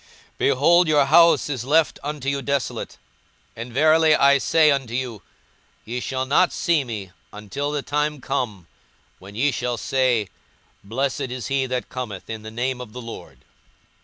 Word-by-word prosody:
42:013:035 -, -, -39 dB
Behold, 170 Hz, +6 st, +4 dB
your 150 Hz, -2 st, +4 dB
house 165 Hz, +4 st, +5 dB
is 135 Hz, -5 st, -3 dB
left 155 Hz, +4 st, +2 dB
unto 145 Hz, -2 st, -5 dB
you 140 Hz, 0 st, 0 dB
desolate: 140 Hz, -3 st, -3 dB, 0.6 s
and 115 Hz, +2 st, -7 dB
verily 155 Hz, +4 st, +4 dB
I 140 Hz, 0 st, +5 dB
say 155 Hz, +2 st, +4 dB
unto 130 Hz, -4 st, -2 dB
you, 125 Hz, -6 st, -4 dB, 0.6 s
Ye 120 Hz, +3 st, -4 dB
shall 130 Hz, +1 st, -3 dB
not 150 Hz, +7 st, +3 dB
see 165 Hz, -5 st, +1 dB
me, 105 Hz, -7 st, -7 dB, 0.2 s
until 105 Hz, +8 st, -5 dB
the 145 Hz, -1 st, -3 dB
time 150 Hz, 0 st, -1 dB
come 120 Hz, -9 st, -3 dB, 0.5 s
when 100 Hz, +2 st, -13 dB
ye 140 Hz, +6 st, +2 dB
shall 120 Hz, -1 st, -2 dB
say, 125 Hz, -7 st, 0 dB, 0.5 s
Blessed 130 Hz, +5 st, -2 dB
is 125 Hz, -1 st, -5 dB
he 135 Hz, -1 st, 0 dB
that 125 Hz, -1 st, -3 dB
cometh 115 Hz, -6 st, -6 dB
in 110 Hz, -1 st, -6 dB
the 110 Hz, -, -8 dB
name 125 Hz, +3 st, -3 dB
of 115 Hz, -4 st, -10 dB
the 125 Hz, -, -7 dB
Lord. 115 Hz, -1 st, -11 dB
130 Hz, 165 wpm, -22 LUFS, 120-145 Hz, 0.6 s, house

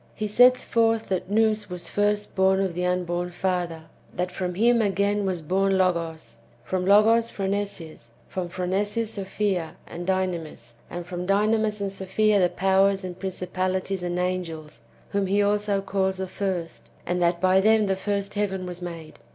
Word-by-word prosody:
He 215 Hz, -, -3 dB
sets 245 Hz, +4 st, +5 dB
forth 225 Hz, -1 st, +1 dB
that 185 Hz, -1 st, -2 dB
Nous 215 Hz, 0 st, +2 dB
was 180 Hz, -1 st, -5 dB
first 205 Hz, 0 st, 0 dB
born 190 Hz, 0 st, +3 dB
of 190 Hz, -2 st, 0 dB
the 180 Hz, +1 st, -3 dB
unborn 180 Hz, -1 st, -1 dB
father, 175 Hz, -2 st, -2 dB, 0.3 s
that 180 Hz, +1 st, -2 dB
from 180 Hz, -2 st, -3 dB
him, 235 Hz, +4 st, +4 dB
again, 200 Hz, 0 st, +1 dB
was 180 Hz, -4 st, -2 dB
born 195 Hz, +4 st, +1 dB
Logos, 165 Hz, -7 st, -1 dB, 0.2 s
from 185 Hz, 0 st, -2 dB
Logos 225 Hz, +3 st, +5 dB
Phronesis, 190 Hz, -, -4 dB
from 180 Hz, -2 st, -4 dB
Phronesis 205 Hz, +5 st, -1 dB
Sophia 195 Hz, -4 st, -2 dB
and 175 Hz, +1 st, -7 dB
Dynamis, 170 Hz, -10 st, -2 dB, 0.2 s
and 175 Hz, 0 st, -6 dB
from 180 Hz, 0 st, -5 dB
Dynamis 210 Hz, +1 st, +2 dB
and 200 Hz, -1 st, -2 dB
Sophia 200 Hz, +2 st, +1 dB
the 180 Hz, -1 st, +3 dB
powers, 195 Hz, +1 st, +2 dB
and 180 Hz, 0 st, -7 dB
principalities, 185 Hz, 0 st, -2 dB
and 175 Hz, 0 st, -2 dB
angels, 180 Hz, -4 st, -3 dB, 0.3 s
whom 200 Hz, -1 st, 0 dB
he 200 Hz, +2 st, +2 dB
also 205 Hz, -1 st, +1 dB
calls 190 Hz, -1 st, 0 dB
the 190 Hz, 0 st, -3 dB
first; 185 Hz, -3 st, -4 dB, 0.2 s
and 180 Hz, 0 st, -1 dB
that 170 Hz, 0 st, +2 dB
by 185 Hz, +1 st, +4 dB
them 220 Hz, +1 st, +4 dB
the 195 Hz, -1 st, +1 dB
first 200 Hz, +1 st, -2 dB
heaven 195 Hz, -3 st, -2 dB
was 180 Hz, 0 st, -6 dB
made. 165 Hz, -3 st, -8 dB
190 Hz, 165 wpm, -25 LUFS, 180-205 Hz, 0.3 s, sets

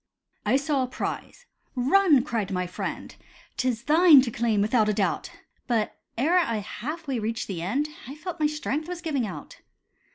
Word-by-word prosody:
I -, -, +4 dB
saw 280 Hz, 0 st, +1 dB
a 255 Hz, -, 0 dB
prize. -, -, -5 dB, 0.3 s
"Run," 290 Hz, +2 st, +4 dB
cried 225 Hz, -8 st, -2 dB
my 180 Hz, -2 st, -1 dB
friend; 180 Hz, -, -5 dB, 0.4 s
"'Tis 245 Hz, -3 st, -1 dB
thine 315 Hz, 0 st, +7 dB
to 250 Hz, -2 st, -2 dB
claim 225 Hz, -2 st, +1 dB
without 215 Hz, +1 st, +2 dB
a -, -, +2 dB
doubt." 200 Hz, -2 st, -1 dB, 0.4 s
But 225 Hz, -4 st, 0 dB, 0.2 s
ere 325 Hz, +9 st, +3 dB
I 235 Hz, -10 st, 0 dB
half 285 Hz, -, -6 dB
way 260 Hz, -4 st, -1 dB
reached 225 Hz, +1 st, -3 dB
the 180 Hz, -4 st, -4 dB
end, 260 Hz, -, 0 dB, 0.2 s
I 275 Hz, -, -7 dB
felt 345 Hz, +2 st, -7 dB
my 305 Hz, -, +3 dB
strength 300 Hz, 0 st, -3 dB
was 355 Hz, -1 st, -5 dB
giving 280 Hz, -9 st, -1 dB
out. 185 Hz, -, -9 dB
255 Hz, 175 wpm, -26 LUFS, 220-305 Hz, 0.4 s, thine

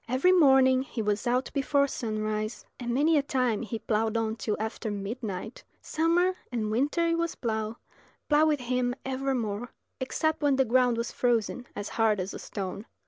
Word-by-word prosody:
Every 260 Hz, +9 st, +3 dB
morning 265 Hz, -6 st, +5 dB
he 260 Hz, -2 st, -7 dB
was 210 Hz, +3 st, -1 dB
out 250 Hz, +2 st, +1 dB
before 280 Hz, 0 st, +2 dB
sunrise, 215 Hz, -3 st, -3 dB
and 240 Hz, -1 st, -3 dB
many 300 Hz, +5 st, +3 dB
a -, -, +2 dB
time 255 Hz, -6 st, 0 dB
he 230 Hz, 0 st, -4 dB
ploughed 220 Hz, 0 st, 0 dB
on 220 Hz, -1 st, -1 dB
till 215 Hz, -2 st, -2 dB
after 220 Hz, +1 st, -3 dB
midnight. 205 Hz, 0 st, -5 dB, 0.2 s
Summer 350 Hz, +3 st, +1 dB
and 220 Hz, -3 st, -1 dB
winter 295 Hz, +9 st, +1 dB
it 335 Hz, 0 st, +1 dB
was 335 Hz, 0 st, -1 dB
plough, 220 Hz, -1 st, -3 dB, 0.5 s
plough 300 Hz, +1 st, +4 dB
with 300 Hz, -3 st, +1 dB
him 250 Hz, 0 st, 0 dB
ever 265 Hz, 0 st, -1 dB
more, 225 Hz, 0 st, -3 dB, 0.3 s
except 315 Hz, +4 st, -1 dB
when 290 Hz, -2 st, +3 dB
the 265 Hz, 0 st, +3 dB
ground 250 Hz, 0 st, +3 dB
was 235 Hz, 0 st, -2 dB
frozen 245 Hz, 0 st, 0 dB
as 205 Hz, 0 st, -4 dB
hard 220 Hz, -2 st, +3 dB
as 185 Hz, +2 st, -3 dB
a -, -, -7 dB
stone. 200 Hz, +1 st, -6 dB
245 Hz, 180 wpm, -28 LUFS, 220-275 Hz, 0.5 s, morning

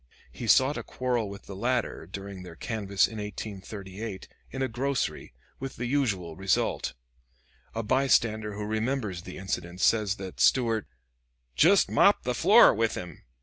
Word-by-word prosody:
He 120 Hz, -, -7 dB
sought 135 Hz, +6 st, +4 dB
a -, -, -6 dB
quarrel 125 Hz, -4 st, -2 dB
with 100 Hz, 0 st, -9 dB
the 100 Hz, -, -9 dB
latter, 120 Hz, -5 st, -1 dB
during 100 Hz, 0 st, -7 dB
their 90 Hz, -2 st, -10 dB
canvass 100 Hz, 0 st, 0 dB
in 110 Hz, -, -8 dB
1838, 100 Hz, 0 st, -7 dB, 0.2 s
in 135 Hz, -, -3 dB
a -, -, +1 dB
grocery, 130 Hz, +2 st, -2 dB, 0.3 s
with 135 Hz, -1 st, -6 dB
the 120 Hz, -, -4 dB
usual 105 Hz, -, -1 dB
result. 95 Hz, +2 st, 0 dB, 0.8 s
A 115 Hz, -, -2 dB
bystander 110 Hz, -4 st, +2 dB
who 105 Hz, 0 st, -4 dB
remembers 110 Hz, -3 st, -2 dB
the -, -, -9 dB
incident 90 Hz, -2 st, -4 dB
says 105 Hz, -1 st, +3 dB
that 95 Hz, -3 st, -8 dB
Stuart 115 Hz, -5 st, +3 dB, 0.7 s
"jest -, -, +5 dB
mopped -, -, +4 dB
the -, -, -1 dB
floor -, -, +7 dB
with 115 Hz, +1 st, 0 dB
him." 90 Hz, -3 st, -8 dB
105 Hz, 150 wpm, -28 LUFS, 95-120 Hz, 0.8 s, floor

